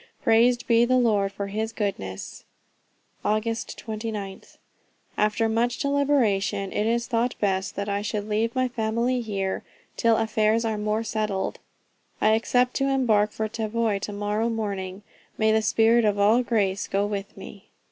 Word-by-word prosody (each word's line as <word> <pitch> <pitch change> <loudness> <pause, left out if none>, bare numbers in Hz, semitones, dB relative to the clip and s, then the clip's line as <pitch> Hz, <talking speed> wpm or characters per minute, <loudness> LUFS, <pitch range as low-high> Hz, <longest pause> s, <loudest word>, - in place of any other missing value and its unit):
Praised 240 +1 +4
be 230 0 +4
the 255 +2 +3
Lord 210 -5 +2
for 200 0 -4
his 215 +3 -3
goodness. 100 - -4 0.8
"Aug. 215 +1 +1
29th. 220 -3 -5 0.6
After 215 +2 +1
much 230 +2 0
deliberation, 255 -9 +1
it 210 - 0
is 235 +1 +1
thought 240 0 0
best 190 -2 -1
that 200 0 -3
I 200 0 -1
should 210 0 -3
leave 220 +2 0
my 255 0 +2
family 235 +1 -1
here, 195 -4 -2 0.4
till 230 -2 +3
affairs 220 0 +1
are 220 -2 -1
more 210 +1 -1
settled.... 210 -3 -2 0.6
I 215 - +4
expect 245 +3 +2
to 275 0 +1
embark 220 -6 +2
for 220 0 -2
Tavoy 220 -1 -1
to 205 - -5
morrow 210 +2 -1
morning. 200 -3 -4 0.3
May 220 0 +3
the 220 0 +3
spirit 225 +3 +3
of 205 -1 +2
all 210 +4 +4
grace 205 -5 0
go 200 +1 0
with 200 -1 -5
me!" 195 +1 -11
220 Hz, 155 wpm, -25 LUFS, 205-230 Hz, 0.8 s, Praised